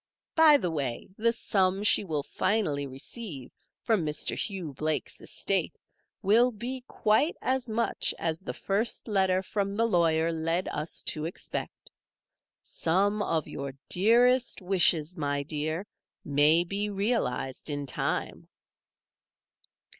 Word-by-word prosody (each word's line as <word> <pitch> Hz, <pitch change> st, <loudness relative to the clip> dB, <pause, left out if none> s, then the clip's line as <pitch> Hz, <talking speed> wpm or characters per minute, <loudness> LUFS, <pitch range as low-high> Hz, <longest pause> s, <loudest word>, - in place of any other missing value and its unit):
By 315 Hz, -2 st, +7 dB
the 180 Hz, -10 st, -2 dB
way, 135 Hz, -6 st, -3 dB
the 230 Hz, +2 st, +2 dB
sum 195 Hz, -4 st, +1 dB
she 210 Hz, -, +4 dB
will 155 Hz, -6 st, -2 dB
finally 155 Hz, -10 st, 0 dB
receive 135 Hz, -, -8 dB, 0.3 s
from 220 Hz, -7 st, +2 dB
Mr. 150 Hz, -1 st, -1 dB
Hugh 185 Hz, -8 st, -4 dB
Blake's 155 Hz, +2 st, -2 dB
estate -, -, -2 dB, 0.5 s
will 230 Hz, +6 st, +5 dB
be 245 Hz, +3 st, -6 dB
quite 220 Hz, +10 st, +2 dB
as 260 Hz, -2 st, -1 dB
much 230 Hz, +2 st, 0 dB
as 160 Hz, -1 st, -1 dB
the 190 Hz, -, -5 dB
first 210 Hz, +6 st, -2 dB
letter 190 Hz, -3 st, +2 dB
from 200 Hz, 0 st, -2 dB
the 230 Hz, -, +3 dB
lawyer 165 Hz, -5 st, +2 dB
led 165 Hz, +3 st, -1 dB
us 150 Hz, +2 st, -3 dB
to 155 Hz, 0 st, -2 dB
expect. 170 Hz, -, -6 dB, 0.7 s
Some 200 Hz, +5 st, 0 dB
of 160 Hz, -6 st, -1 dB
your 140 Hz, -1 st, -6 dB
dearest 240 Hz, +6 st, +3 dB
wishes, 180 Hz, -2 st, +3 dB
my 145 Hz, -1 st, -1 dB
dear, 155 Hz, +5 st, -3 dB, 0.4 s
may 150 Hz, +4 st, +4 dB
be 200 Hz, +4 st, -2 dB
realized 195 Hz, -, -1 dB
in 145 Hz, -1 st, -3 dB
time." 130 Hz, -, -2 dB
185 Hz, 125 wpm, -28 LUFS, 155-215 Hz, 0.7 s, By